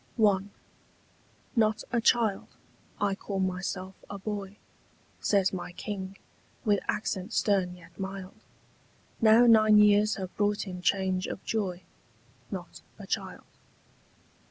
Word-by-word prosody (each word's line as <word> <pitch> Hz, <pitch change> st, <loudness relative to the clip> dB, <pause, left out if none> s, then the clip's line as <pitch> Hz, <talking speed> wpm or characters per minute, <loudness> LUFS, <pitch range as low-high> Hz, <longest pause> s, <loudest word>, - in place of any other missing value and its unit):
I. 205 Hz, -4 st, +4 dB, 1.2 s
'NOT 220 Hz, -2 st, +2 dB
a 235 Hz, -1 st, +1 dB
child: 225 Hz, -4 st, +2 dB, 0.5 s
I 205 Hz, -1 st, +1 dB
call 195 Hz, 0 st, -4 dB
myself 185 Hz, 0 st, -2 dB, 0.2 s
a 200 Hz, -, -5 dB
boy,' 200 Hz, 0 st, -5 dB, 0.6 s
Says 195 Hz, -2 st, +2 dB
my 180 Hz, -1 st, -5 dB
king, 190 Hz, 0 st, -6 dB, 0.5 s
with 205 Hz, -2 st, +3 dB
accent 210 Hz, 0 st, -2 dB
stern 190 Hz, -4 st, +1 dB
yet 170 Hz, -1 st, -17 dB
mild, 190 Hz, -1 st, -6 dB, 0.8 s
Now 225 Hz, +2 st, +7 dB
nine 215 Hz, -2 st, +7 dB
years 210 Hz, 0 st, +5 dB
have 185 Hz, -2 st, -6 dB
brought 205 Hz, 0 st, +1 dB
him 180 Hz, -2 st, -6 dB
change 190 Hz, 0 st, +1 dB
of -, -, -6 dB
joy; 190 Hz, -5 st, -2 dB, 0.7 s
'Not -, -, -7 dB, 0.2 s
a -, -, -9 dB
child. -, -, -4 dB
200 Hz, 120 wpm, -29 LUFS, 190-215 Hz, 1.2 s, Now